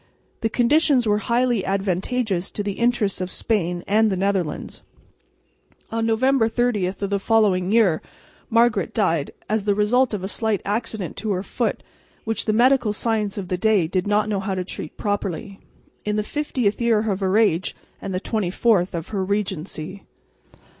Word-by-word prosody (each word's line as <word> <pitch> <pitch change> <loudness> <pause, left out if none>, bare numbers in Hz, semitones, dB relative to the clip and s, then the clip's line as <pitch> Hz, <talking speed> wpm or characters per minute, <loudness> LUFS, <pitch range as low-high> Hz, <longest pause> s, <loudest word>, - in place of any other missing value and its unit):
The 225 - 0
conditions 260 +2 +3
were 210 -1 +2
highly 235 -1 +1
advantageous 195 +1 -1
to 205 - -3
the 200 - -2
interests 235 -6 +1
of 185 - -2
Spain 180 -5 -1
and 215 +2 +3
the 190 - -1
Netherlands. 190 -4 -2 1.1
On 225 0 0
November 230 +1 +3
30 225 -5 +1
of 185 - -5
the 200 - +1
following 195 -4 +2
year 210 -8 +3 0.5
Margaret 230 -6 +2
died, 160 -4 +1 0.2
as 215 0 -1
the 205 -1 +2
result 230 +3 +2
of 190 - -5
a - - -2
slight 220 0 -1
accident 210 -2 -3
to 215 +2 -3
her 185 0 -2
foot - - -2 0.4
which 225 0 -2
the 215 - +2
medical 240 -1 +3
science 215 -2 -1
of 195 -3 -4
the 180 0 -2
day 210 -4 +3
did 185 +4 -1
not 210 +1 +2
know 205 -2 -1
how 195 0 -2
to 185 -1 -3
treat 155 - -7
properly, 200 -1 -3 0.4
in 210 0 -1
the 210 - 0
50th 250 -5 -1
year 225 -2 +2
of 190 - -2
her 190 +1 +1
age 190 -5 +2 0.3
and 195 - -5
the 185 - -1
24th 195 -2 +1
of 165 -1 -5
her 200 -3 -1
regency. 190 -2 -3
205 Hz, 170 wpm, -22 LUFS, 190-225 Hz, 1.1 s, conditions